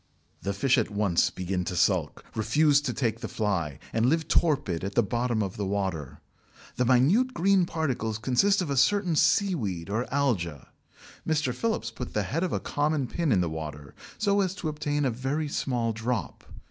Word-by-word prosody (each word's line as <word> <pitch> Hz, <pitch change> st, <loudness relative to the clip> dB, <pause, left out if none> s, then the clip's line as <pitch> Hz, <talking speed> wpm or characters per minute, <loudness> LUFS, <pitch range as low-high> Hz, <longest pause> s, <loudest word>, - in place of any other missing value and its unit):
The 100 Hz, 0 st, -2 dB
fish 130 Hz, +5 st, +3 dB
at 110 Hz, -, -1 dB
once 100 Hz, -5 st, +2 dB
begin 90 Hz, 0 st, -3 dB
to 90 Hz, -, -3 dB
sulk, -, -, +1 dB
refuse 145 Hz, +6 st, +3 dB
to 145 Hz, -4 st, -2 dB
take 115 Hz, -2 st, -1 dB
the -, -, -5 dB
fly, 90 Hz, -10 st, -2 dB, 0.2 s
and 115 Hz, +1 st, +2 dB
live 160 Hz, +3 st, +1 dB
torpid 135 Hz, -, +1 dB
at 100 Hz, +1 st, -4 dB
the 120 Hz, -, +4 dB
bottom 120 Hz, +1 st, 0 dB
of 95 Hz, -2 st, -5 dB
the 100 Hz, -, -2 dB
water. 85 Hz, -8 st, -3 dB, 0.6 s
The 125 Hz, -, +2 dB
minute 155 Hz, -, +3 dB
green 185 Hz, 0 st, +3 dB
particles 130 Hz, -10 st, -2 dB
consist 180 Hz, -, +2 dB
of 150 Hz, -, -4 dB
a 140 Hz, -, -1 dB
certain 185 Hz, +3 st, +3 dB
seaweed 140 Hz, -, +1 dB
or 115 Hz, +4 st, -2 dB
alga. 95 Hz, -, -1 dB, 0.6 s
Mr. 150 Hz, -5 st, +1 dB
Phillips 220 Hz, -, -2 dB
put 125 Hz, -, -7 dB
the 105 Hz, -, +1 dB
head 145 Hz, -, -2 dB
of 185 Hz, -, -1 dB
a -, -, 0 dB
common 145 Hz, -1 st, 0 dB
pin 165 Hz, +3 st, -1 dB
in 95 Hz, -, +4 dB
the 85 Hz, -, 0 dB
water 75 Hz, -3 st, -6 dB, 0.2 s
so 200 Hz, -1 st, +2 dB
as 190 Hz, -1 st, -1 dB
to 160 Hz, -, -3 dB
obtain 145 Hz, -1 st, -1 dB
a 130 Hz, -, +1 dB
very 135 Hz, +6 st, -2 dB
small 120 Hz, -5 st, -1 dB
drop. 115 Hz, -, -3 dB
125 Hz, 185 wpm, -27 LUFS, 100-155 Hz, 0.6 s, the